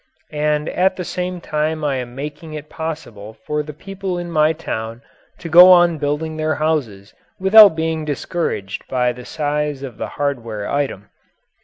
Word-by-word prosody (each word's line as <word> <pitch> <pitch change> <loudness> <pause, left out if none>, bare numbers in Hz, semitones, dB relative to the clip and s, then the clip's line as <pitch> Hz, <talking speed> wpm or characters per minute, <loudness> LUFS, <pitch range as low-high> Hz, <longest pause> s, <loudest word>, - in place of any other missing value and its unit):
And 150 0 0
at 185 +1 +1
the 180 - -4
same 180 +1 -4
time 155 0 -2
I 140 -2 0
am 125 -1 -6
making 150 +3 -7
it 150 0 -9
possible 135 -10 -6
for 150 0 -1
the 150 0 -7
people 190 +3 -5
in 175 -1 -5
my 155 -1 +3
town 115 -7 -5 0.3
to 170 - -8
go 175 +3 +9
on 175 -3 +5
building 150 +2 -2
their 155 0 0
houses 135 -11 -2 0.3
without 200 -1 +8
being 160 -1 -2
discouraged 145 - -3
by 125 -1 +1
the 125 0 -10
size 150 -2 -2
of 125 -5 -8
the - - -3
hardware 115 -8 -3
item." 135 -8 -2
150 Hz, 165 wpm, -19 LUFS, 135-165 Hz, 0.3 s, go